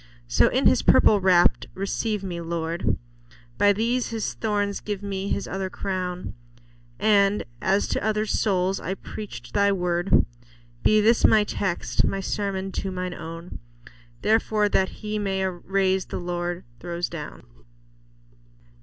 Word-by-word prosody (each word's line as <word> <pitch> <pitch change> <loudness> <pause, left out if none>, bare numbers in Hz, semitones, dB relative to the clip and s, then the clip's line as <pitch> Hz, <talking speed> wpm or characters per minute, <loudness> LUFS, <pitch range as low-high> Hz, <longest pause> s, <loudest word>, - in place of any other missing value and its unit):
So, - - +4
in - - +1
His - - +5
purple 205 -2 +5
wrapp'd, 180 -2 +4
receive 200 +2 -2
me, 175 -3 -4
Lord; 165 0 -1 0.6
By 205 0 +6
these 235 +4 0
His 225 -2 -3
thorns, 205 -2 -1
give 205 -1 -5
me 195 -1 -3
His 200 - -2
other 195 -1 -3
crown; 185 -2 -4 0.6
And 205 -1 +3 0.2
as 195 +2 +2
to - - -1
others' 215 0 0
souls 190 -2 +1
I 185 +3 -3
preach'd 210 +1 -9
Thy 200 0 +3
word, 175 -1 +2 0.6
Be 215 0 +4
this 225 +2 +4
my 215 -1 +6
text, 195 -3 -1
my 195 - 0
sermon 195 -1 -2
to 195 - -3
mine 185 -1 -4
own, 165 +1 -8 0.6
"Therefore 215 -1 +2
that 190 -1 +2
He 215 0 -4
may 190 -2 -1
raise, 190 +1 0
the - - -5
Lord 175 0 -3 0.2
throws 175 0 -3
down." 155 -4 -8
195 Hz, 140 wpm, -25 LUFS, 180-205 Hz, 0.6 s, By